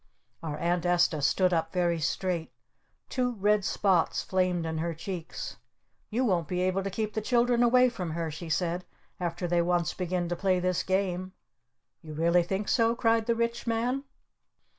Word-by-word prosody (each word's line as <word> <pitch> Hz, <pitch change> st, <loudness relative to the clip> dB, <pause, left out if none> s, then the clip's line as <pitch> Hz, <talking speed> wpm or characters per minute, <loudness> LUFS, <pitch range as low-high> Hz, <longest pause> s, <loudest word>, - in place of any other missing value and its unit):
Our 155 Hz, -3 st, -4 dB
Aunt 175 Hz, +1 st, 0 dB
Esta 175 Hz, -3 st, +2 dB
stood 180 Hz, +6 st, +3 dB
up 165 Hz, -1 st, 0 dB
very 175 Hz, -2 st, +1 dB
straight. 170 Hz, +1 st, -1 dB, 0.6 s
Two 250 Hz, -1 st, -1 dB
red 210 Hz, -1 st, +2 dB
spots 190 Hz, -4 st, +1 dB
flamed 180 Hz, -2 st, 0 dB
in 160 Hz, -1 st, -2 dB
her 165 Hz, 0 st, -2 dB
cheeks. 170 Hz, 0 st, -6 dB, 0.5 s
"You 250 Hz, +4 st, 0 dB
won't 175 Hz, -8 st, +1 dB
be 180 Hz, +2 st, -1 dB
able 185 Hz, +1 st, +1 dB
to 195 Hz, -, -3 dB
keep 215 Hz, +2 st, -3 dB
the 220 Hz, -, -1 dB
children 240 Hz, +1 st, +2 dB
away 250 Hz, +1 st, +5 dB
from 190 Hz, -8 st, -4 dB
her," 165 Hz, -1 st, -2 dB
she 165 Hz, +2 st, -7 dB
said, 175 Hz, +2 st, 0 dB, 0.4 s
"after 175 Hz, 0 st, -2 dB
they 175 Hz, 0 st, +2 dB
once 175 Hz, -2 st, +1 dB
begin 180 Hz, -1 st, -2 dB
to 175 Hz, -, -1 dB
play 185 Hz, 0 st, +1 dB
this 180 Hz, -1 st, 0 dB
game!" 185 Hz, -1 st, -1 dB, 0.7 s
"You 155 Hz, -1 st, -9 dB
really 170 Hz, +3 st, +3 dB
think 190 Hz, +4 st, -2 dB
so?" 230 Hz, -1 st, +3 dB
cried 225 Hz, -1 st, +2 dB
the 235 Hz, -, +2 dB
Rich 235 Hz, +1 st, -2 dB
Man. 240 Hz, +4 st, 0 dB
180 Hz, 175 wpm, -28 LUFS, 170-215 Hz, 0.7 s, away